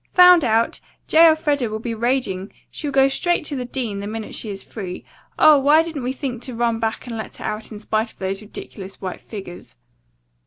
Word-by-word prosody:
"Found 360 Hz, -2 st, +8 dB
out! 225 Hz, -1 st, +1 dB, 0.3 s
J. 330 Hz, +1 st, +7 dB
Elfreda 295 Hz, -6 st, +2 dB
will 215 Hz, -, -3 dB
be 230 Hz, +1 st, -4 dB
raging. 225 Hz, -5 st, -1 dB, 0.2 s
She'll 295 Hz, -, -4 dB
go 270 Hz, 0 st, +5 dB
straight 345 Hz, +4 st, 0 dB
to 290 Hz, -, -2 dB
the 250 Hz, -2 st, -3 dB
dean, 240 Hz, -5 st, -3 dB
the 200 Hz, -, -5 dB
minute 220 Hz, 0 st, -6 dB
she 220 Hz, -, -5 dB
is 195 Hz, -1 st, -6 dB
free. 185 Hz, -5 st, -7 dB, 0.3 s
Oh, 305 Hz, -2 st, +7 dB
why 295 Hz, +4 st, +5 dB
didn't 325 Hz, -4 st, -5 dB
we 250 Hz, +1 st, -2 dB
think 255 Hz, -3 st, -4 dB
to 250 Hz, -1 st, -6 dB
run 230 Hz, -1 st, 0 dB
back 225 Hz, -1 st, -2 dB
and 240 Hz, -2 st, -6 dB
let 220 Hz, -, -6 dB
her -, -, -8 dB
out 215 Hz, +2 st, -4 dB
in 215 Hz, -, -7 dB
spite 215 Hz, +1 st, -1 dB
of -, -, -27 dB
those 195 Hz, +1 st, -3 dB
ridiculous 200 Hz, -2 st, -9 dB
white 185 Hz, -2 st, -6 dB
figures?" 190 Hz, -, -9 dB
230 Hz, 210 wpm, -21 LUFS, 215-275 Hz, 0.3 s, Found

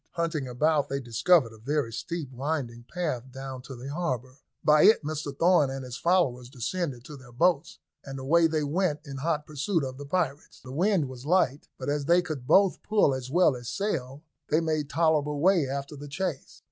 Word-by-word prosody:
Hunting 165 Hz, -5 st, -2 dB
about 145 Hz, +4 st, +1 dB
they 140 Hz, -, -1 dB
discovered 125 Hz, +2 st, +3 dB
a 110 Hz, -, -15 dB
very 135 Hz, 0 st, -1 dB
steep 160 Hz, +1 st, -5 dB
winding 130 Hz, -3 st, -3 dB
path 140 Hz, -8 st, -3 dB
down 135 Hz, 0 st, -7 dB
to 135 Hz, +1 st, -9 dB
the 125 Hz, +3 st, -8 dB
harbour. 130 Hz, -6 st, -3 dB, 0.2 s
By 150 Hz, 0 st, +5 dB
it 220 Hz, -, +6 dB
Mr 150 Hz, -1 st, -3 dB
Thorn 170 Hz, -4 st, +4 dB
and 135 Hz, -1 st, -5 dB
his 125 Hz, -1 st, -7 dB
followers 130 Hz, -8 st, +1 dB
descended 135 Hz, 0 st, -3 dB
to 150 Hz, -, -9 dB
their 130 Hz, -3 st, -14 dB
boats, 165 Hz, +5 st, +1 dB, 0.3 s
and 135 Hz, 0 st, -7 dB
away 165 Hz, +5 st, +3 dB
they 155 Hz, -1 st, -1 dB
went 150 Hz, +1 st, 0 dB
in 140 Hz, -2 st, -7 dB
hot 150 Hz, +1 st, -1 dB
pursuit 155 Hz, +3 st, -1 dB
of 130 Hz, 0 st, -5 dB
the 145 Hz, -, -7 dB
pirates. 150 Hz, -3 st, -2 dB
The 130 Hz, -, -10 dB
wind 180 Hz, -1 st, +2 dB
was 130 Hz, +1 st, -9 dB
light, 155 Hz, -5 st, +2 dB
but 130 Hz, -, -6 dB
as 145 Hz, 0 st, -1 dB
they 175 Hz, +3 st, +4 dB
could 150 Hz, -8 st, -6 dB
both 195 Hz, +4 st, +4 dB
pull 205 Hz, -10 st, +3 dB
as 130 Hz, -1 st, -5 dB
well 160 Hz, -2 st, +4 dB
as 120 Hz, -1 st, -7 dB
sail, 140 Hz, -, -3 dB, 0.3 s
they 155 Hz, -, +3 dB
made 155 Hz, -3 st, -1 dB
tolerable 150 Hz, -2 st, +1 dB
way 175 Hz, -3 st, +3 dB
after 140 Hz, +2 st, -4 dB
the 145 Hz, +1 st, -9 dB
chase. 160 Hz, 0 st, -4 dB
145 Hz, 195 wpm, -27 LUFS, 130-165 Hz, 0.3 s, it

